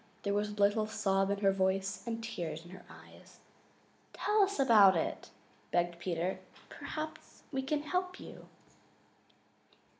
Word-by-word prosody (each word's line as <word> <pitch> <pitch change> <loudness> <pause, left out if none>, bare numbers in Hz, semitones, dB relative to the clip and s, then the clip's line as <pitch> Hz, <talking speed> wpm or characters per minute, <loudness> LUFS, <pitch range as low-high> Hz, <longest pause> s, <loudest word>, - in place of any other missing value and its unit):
There 200 - 0
was 205 +1 0
a - - -6
little 205 +1 +2
sob 195 -2 +1
in 200 0 -1
her 195 -1 +5
voice 190 +1 0
and 230 -1 -3
tears 165 -8 -4
in 175 - -12
her 185 - -11
eyes. - - -15 0.8
"Tell 420 0 +2
us 400 -3 +1
all 275 - +4
about 205 -7 +7
it," 160 - -3 0.4
begged 175 -1 0
Peter. 180 +1 -2 0.3
"Perhaps 310 0 -7
we 265 - -1
can 290 +2 -1
help 365 +3 -2
you." - - -11
200 Hz, 150 wpm, -33 LUFS, 190-265 Hz, 0.8 s, about